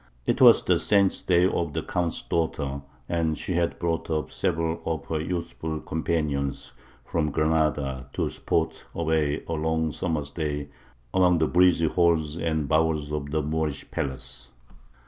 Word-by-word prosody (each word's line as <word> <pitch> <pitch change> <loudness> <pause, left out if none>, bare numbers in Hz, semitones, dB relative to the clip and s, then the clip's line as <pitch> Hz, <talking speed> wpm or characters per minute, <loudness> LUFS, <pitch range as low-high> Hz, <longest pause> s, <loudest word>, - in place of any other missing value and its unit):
It - - 0
was - - +8
the - - +3
saint's 100 -2 +3
day 90 -1 +3
of 85 -4 0
the - - -2
Count's 85 -2 -2
daughter, 70 -4 -1 0.3
and 80 -2 0
she 90 - -3
had 85 0 0
brought 85 -1 -2
up 80 -1 -1
several 85 -3 -1
of 80 -4 -3
her 80 -1 -1
youthful 80 -3 -4
companions 75 -4 -2 0.3
from 75 +1 0
Granada 75 -4 0
to - - 0
sport - - -1
away 80 -2 0
a 85 - -2
long 80 0 0
summer's 75 -4 -2
day 75 -3 -3 0.4
among 90 -2 +4
the 80 - +3
breezy 90 -2 +4
halls 80 -3 +2
and 80 -3 -1
bowers 80 -1 +1
of 75 -1 -3
the 75 +1 0
Moorish 75 -1 -2
palace. 65 -2 -5
80 Hz, 150 wpm, -26 LUFS, 75-85 Hz, 0.4 s, was